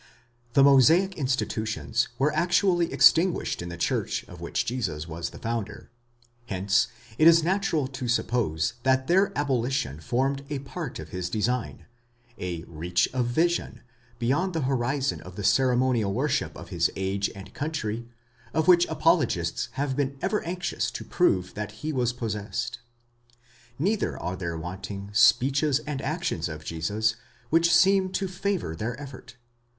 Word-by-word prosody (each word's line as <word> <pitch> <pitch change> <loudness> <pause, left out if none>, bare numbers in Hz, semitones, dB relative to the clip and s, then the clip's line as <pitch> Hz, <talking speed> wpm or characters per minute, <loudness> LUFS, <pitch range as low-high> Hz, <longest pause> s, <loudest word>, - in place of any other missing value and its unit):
The 135 - +6
Mosaic 160 +8 +5
institutions 120 -5 -1
were 145 +4 +2
actually 175 +1 +2
extinguished 175 - +4
in 85 - -5
the 85 - -7
church - - -1
of - - -13
which - - -2
Jesus 90 -11 -3
was 85 0 -4
the - - -12
founder; 110 -2 -4 0.6
hence 95 0 +2 0.3
it 155 - +7
is 165 -1 +7
natural 180 -4 +1
to 135 -2 -5
suppose 115 -9 0
that 130 +1 +2
their 190 +6 +3
abolition 130 - -1
formed 135 - -1
a 145 - -2
part 140 +2 -6
of 80 0 -8
his 90 +1 -4
design 115 +4 -2 0.5
:—a 85 -3 -4
reach 85 +2 -1
of 125 -2 0
vision, 170 +8 0 0.4
beyond 145 +11 0
the 160 - 0
horizon 135 +1 0
of 90 0 -11
the 105 - -5
ceremonial 125 -1 +2
worship - - -1
of - - -10
his - - +1
age 95 +1 -1
and 95 -1 -11
country, 120 -7 -3 0.5
of 160 -1 +1
which 175 -1 +6
apologists - - +1
have 135 -1 -2
been 140 -1 -1
ever 210 - 0
anxious 170 -9 -2
to - - -6
prove 95 - +1
that 105 0 -5
he 155 - -1
was 125 -3 +1
possessed.! 115 0 -4 1.0
Neither 200 +8 0
are 90 - -3
there 85 -3 -4
wanting 100 +4 -6
speeches 130 +6 +4
and 145 -3 -3
actions 155 - -2
of 75 0 -8
Jesus 105 +7 -1 0.3
which 165 +1 +4
seem 190 +2 +5
to 195 - -1
favour 185 - -2
their 115 +8 -4
effort. 140 -3 -10
125 Hz, 150 wpm, -26 LUFS, 100-155 Hz, 1.0 s, it